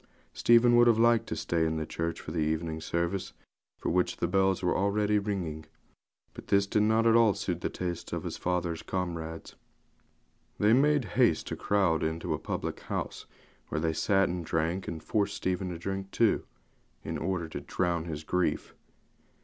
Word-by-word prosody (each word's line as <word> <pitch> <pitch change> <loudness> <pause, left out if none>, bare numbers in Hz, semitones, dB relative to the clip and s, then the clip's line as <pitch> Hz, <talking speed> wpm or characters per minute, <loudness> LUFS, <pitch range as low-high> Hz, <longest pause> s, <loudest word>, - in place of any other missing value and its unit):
Stephen 120 +1 +5
would 120 0 +6
have 115 -2 +5
liked 115 0 +4
to - - -3
stay 85 -1 0
in 80 0 0
the 80 - -2
church 85 +2 -3
for - - -8
the 80 - -2
evening 80 +1 -1
service, 85 +4 -2 0.4
for - - -3
which 90 +1 +1
the 85 - 0
bells 95 +1 +2
were 90 - +2
already 105 +2 +2
ringing; 90 -7 -4 0.7
but - - -11
this 100 0 +3
did 105 +1 +1
not 110 +2 +3
at 115 0 +5
all 115 -3 +5
suit 95 -4 -3
the - - -1
tastes 90 -2 -5
of - - -3
his - - -4
father's 85 -2 -2
old - - -22
comrades. 80 -3 -4 1.0
They 105 +2 +4
made 145 0 +3
haste - - +4
to - - -3
crowd 95 -6 +1
into 80 +1 -2
a - - -3
public - - -4
house, - - -5 0.4
where - - -2
they 80 0 0
sat 95 +4 +2
and 90 0 -3
drank, 80 +4 -1
and 80 -2 -5
forced 100 -1 0
Stephen 95 0 -2
to 85 - -5
drink 95 +2 -4
too, 115 +2 +2 0.6
in - - -4
order 90 -1 -2
to 70 - -6
'drown 85 +1 -1
his 80 -2 -5
grief.' 90 +3 -1
90 Hz, 185 wpm, -29 LUFS, 80-105 Hz, 1.0 s, would